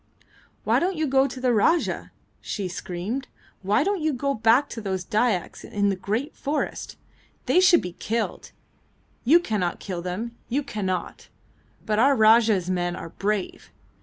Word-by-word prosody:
"Why - - +3
don't 370 +2 0
you 315 -1 0
go 270 -1 +3
to 265 - -8
the 255 -1 +2
Rajah?" 325 +11 +1 0.3
she 200 -4 -4
screamed. 185 +8 -4 0.3
"Why 205 +9 +2
do 405 +4 +1
you 310 -1 0
go 275 +2 -1
back 230 +4 +3
to 230 - -6
those 190 -3 -3
Dyaks 215 -4 0
in 205 -1 0
the 195 - 0
great 215 +10 -3
forest? 295 +2 -3 0.5
They - - +4
should 365 -2 +5
be 180 - -5
killed. 225 +5 -3 0.8
You 315 +8 +7
cannot 205 - -2
kill 180 -4 -5
them, 205 +7 -4
you 280 +5 0
cannot; 190 -7 -4 0.6
but 215 0 0
our 275 +4 +5
Rajah's 220 -4 +4
men 175 -1 -1
are 165 - -7
brave! 200 +2 -3
220 Hz, 160 wpm, -25 LUFS, 190-275 Hz, 0.8 s, You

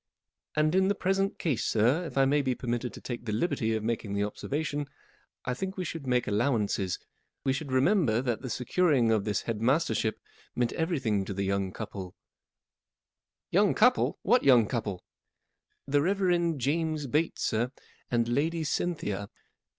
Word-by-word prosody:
" - - -62
And 155 +1 +2
in 190 +1 +4
the 200 - +2
present 195 +1 0
case, 140 -9 -1
sir, 125 +11 +2
if 160 - -7
I 135 - +5
may 145 +2 +3
be 130 -2 0
permitted 120 0 -2
to - - -10
take 120 -1 -6
the 110 - -2
liberty 110 -2 0
of 110 - -2
making 110 -2 -2
the 100 - +1
observation, 145 +7 -3 0.6
I 125 - 0
think 190 +9 -4
we 185 - -2
should 160 -4 -5
make 125 -1 +2
allow¬ 115 +4 +1
ances, 100 -3 -1 0.5
We 135 - +2
should 140 0 -4
remember 130 - +3
that 120 -3 -1
the 130 - -5
secur¬ 145 +6 +1
ing 115 -2 +3
of 110 -3 +1
this 105 -3 -1
head 110 -2 -3
mastership 115 -4 +1 0.4
meant 120 -1 0
everything 135 - 0
to 100 - -5
the 100 - -1
young 100 -1 0
couple/' 95 -3 -7 0.7
" - - -64
Young 200 +3 +4
couple! 250 +3 +3
What 245 +1 +4
young 125 -5 +6
couple? 105 -5 -3 0.4
" - - -50
M - - -8
The 145 0 +4
Reverend 175 -3 +1
James 155 +3 0
Bates, 150 +5 0
sir, 120 +3 0 0.4
and 115 -1 +1
Lady 160 +7 0
Cynthia. 105 - -2
130 Hz, 180 wpm, -29 LUFS, 110-160 Hz, 0.7 s, young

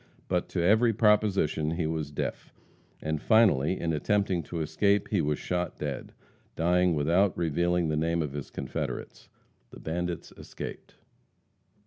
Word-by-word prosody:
But 90 -1 -1
to 85 - -1
every 110 +5 +4
proposition 100 -8 +2
he 85 -1 -1
was 80 -2 -2
deaf, 75 - -4 0.5
and 80 -1 -2
finally, 95 - +4
in 80 -1 -1
attempting 95 +2 +1
to 85 - -5
escape, 100 +6 +1
he 100 -5 +2
was 75 -1 0
shot 90 0 -3
dead, 70 -3 -5 0.4
dying 90 +1 +2
without 85 +7 +2
revealing 85 +1 +1
the 75 - 0
name 85 +1 +1
of 75 - -4
his 70 -1 -6
confederates. 65 - -5 0.4
The - - -12
bandits 85 +2 -4
escaped. - - -9
85 Hz, 140 wpm, -28 LUFS, 80-95 Hz, 0.5 s, every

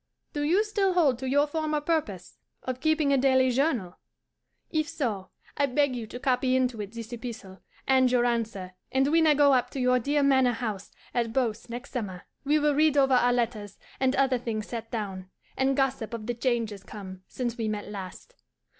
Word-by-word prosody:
Do 290 - -2
you 345 +8 +3
still 405 -3 0
hold 290 -9 +3
to 260 -1 -3
your 285 +2 +4
former 305 0 -1
purpose 290 - -3 0.2
of 255 -1 -4
keeping 310 -1 +2
a 275 - +3
daily 260 -1 +4
journal? 245 - 0 0.7
If 310 -1 0
so, 205 -9 -3 0.3
I 285 - +2
beg 275 0 +1
you 230 -3 -5
to 245 - -8
copy 255 0 +1
into 250 -4 0
it 200 -1 -7
this 230 0 -7
epistle 225 -5 -8 0.3
and 260 -1 +4
your 245 -1 +3
answer; 225 -6 -2 0.2
and 265 +1 +2
when 320 +1 +4
I 300 - +5
go 285 -1 +5
up 250 -2 +2
to 275 - -6
your 250 0 +3
dear 285 +4 +1
manor 265 -3 +4
house 215 -5 -5 0.2
at 235 -2 -1
Beauce 235 -3 -1
next 245 +3 -7
summer, 195 -8 -5 0.2
we 290 +2 +3
will 300 -1 +2
read 300 0 +3
over 270 -1 +4
our 245 -1 +4
letters 225 -4 -2 0.2
and 265 0 +2
other 265 -2 +2
things 220 -3 -3
set 230 -1 -6
down, 195 -5 -5 0.3
and 265 0 +1
gossip 260 -4 0
of 220 -2 -7
the 240 - -1
changes 230 -4 -1
come 190 -2 -9
since 240 -2 -3
we 225 -3 -2
met 210 -1 -3
last. 200 - -8
250 Hz, 200 wpm, -27 LUFS, 225-280 Hz, 0.7 s, I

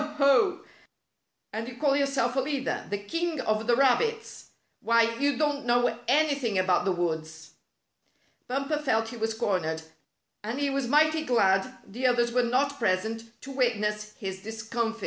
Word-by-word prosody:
Ho! 300 +5 +2 0.9
And 225 +1 -4
you 245 -1 -9
call 280 0 +2
yourself 275 -3 0
a - - +2
leader 275 0 -2
— - - -15
the 205 - -1
king 330 +10 -3
of 215 -2 -1
the 240 - +4
rabbits 445 - +1 0.3
1 230 - +1
Why, 230 - -4
you 285 -2 +1
don't 290 -1 0
know 240 -1 +2
anything 280 -6 +2
about 185 -1 +2
the 195 - +2
woods." 160 -2 -3 1.0
Bumper 275 +4 -1
felt 225 -6 0
he 240 - -8
was 225 0 -2
cornered, 170 -8 -1 0.6
and 225 +6 -4
he 285 -1 0
was 275 -2 -1
mighty 310 +3 +3
glad 210 -4 +2
the 245 +6 -1
others 240 -1 +2
were 250 +1 +2
not 270 +4 0
present 225 +3 -2
to 275 - -9
wit 250 -4 +1
ness 210 0 -3
his 190 -5 -6
discomfit. 225 +2 -3
240 Hz, 165 wpm, -27 LUFS, 215-275 Hz, 1.0 s, the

